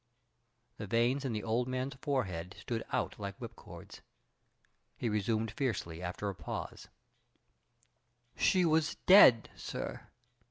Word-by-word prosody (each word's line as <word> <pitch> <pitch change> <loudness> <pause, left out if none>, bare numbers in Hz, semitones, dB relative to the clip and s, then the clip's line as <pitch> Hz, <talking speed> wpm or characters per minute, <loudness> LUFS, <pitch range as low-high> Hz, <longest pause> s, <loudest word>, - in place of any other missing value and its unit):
The 105 - -6
veins 120 +6 +1
in 130 - -1
the 110 -2 -3
old 120 +2 0
man's 130 +2 -3
forehead 100 - -3
stood 115 -3 -4
out - - -2
like - - -5
whipcords. - - -11 1.0
He 120 - -1
resumed 110 +1 0
fiercely 100 -9 -3
after 90 +3 -4
a 100 - -2
pause: 75 -6 -7 1.5
"She 185 -2 +3
was 160 -1 +2
dead, 155 - +8
sir. - - -6
115 Hz, 120 wpm, -32 LUFS, 100-135 Hz, 1.5 s, dead